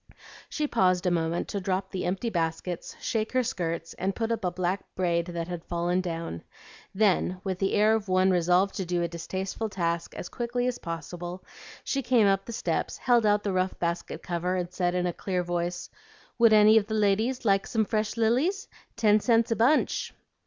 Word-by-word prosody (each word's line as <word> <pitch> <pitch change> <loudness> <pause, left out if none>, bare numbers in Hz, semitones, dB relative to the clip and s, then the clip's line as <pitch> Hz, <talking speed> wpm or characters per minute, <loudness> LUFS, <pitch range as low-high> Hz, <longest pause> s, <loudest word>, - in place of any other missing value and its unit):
She 305 - -1
paused 185 -8 +2
a 180 - +2
moment 165 0 0
to 200 - -2
drop 190 0 -2
the 185 - -3
empty 195 +6 -1
baskets, 165 0 -3
shake 220 +1 -2
her 255 0 +3
skirts, 170 -8 -3
and 190 +2 -1
put 225 0 -2
up 225 -2 -2
a 180 - +2
black 180 +2 -1
braid 170 -2 0
that 170 -1 -4
had 175 -2 -5
fallen 175 +1 0
down; 165 - -4 0.5
then, 190 -3 +2
with 190 -2 -3
the 195 - 0
air 215 +1 +4
of 220 -2 -1
one 185 0 +3
resolved 180 +2 +3
to 190 - -1
do 175 -1 0
a - - 0
distasteful 185 +6 -4
task 170 -3 -2
as - - -6
quickly 245 +3 -2
as 250 -1 -1
possible, 175 +2 -6 0.4
she 275 - -1
came 245 -4 +3
up 195 -1 +2
the - - -7
steps, 225 - -2
held 240 -4 +3
out 205 0 +3
the 200 - -1
rough 185 0 0
basket 170 0 -3
cover, 180 +1 -1
and 180 -1 -3
said 180 -1 0
in 180 0 0
a 175 - -1
clear 180 0 -2
voice, 175 0 -3 0.5
"Would 230 -1 +6
any 215 +1 +7
of 205 - -6
the 220 - -2
ladies 220 +5 +1
like 195 -2 +3
some 220 -2 +1
fresh 215 +1 -1
lilies? 260 - +1 0.3
Ten 215 -2 +4
cents 230 +1 +2
a - - +3
bunch." 255 +8 +2
190 Hz, 200 wpm, -27 LUFS, 175-220 Hz, 0.5 s, any